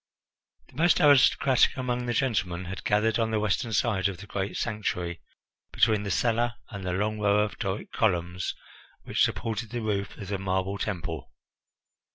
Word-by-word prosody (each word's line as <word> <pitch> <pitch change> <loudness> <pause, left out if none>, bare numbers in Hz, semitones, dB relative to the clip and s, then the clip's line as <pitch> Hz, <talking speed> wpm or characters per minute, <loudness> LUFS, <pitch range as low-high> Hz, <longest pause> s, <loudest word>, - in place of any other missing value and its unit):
The - - -17
most 170 +1 +4
aristocratic 140 -3 +5
among 125 -1 -2
the 120 - 0
gentlemen 100 -9 0
had 95 +2 -6
gathered 110 +2 +2
on 115 -1 +1
the 110 -1 0
western 105 +2 0
side 105 -2 +1
of 95 -3 -5
the 100 - -10
great 100 -1 -3
sanctuary, 90 -6 -2 0.5
between 110 -2 +3
the 100 - -4
cella 120 +4 +1
and 100 -3 -6
the 90 -1 -2
long 105 +3 -1
row 105 0 +3
of 105 - -3
Doric 95 -1 -3
columns 90 -4 0 0.5
which - - -1
supported 115 0 0
the 120 +1 -4
roof 100 -2 -2
of 100 -3 -8
the 100 -2 -2
marble 95 +1 -1
temple. 85 -6 -4
105 Hz, 170 wpm, -27 LUFS, 95-115 Hz, 0.5 s, aristocratic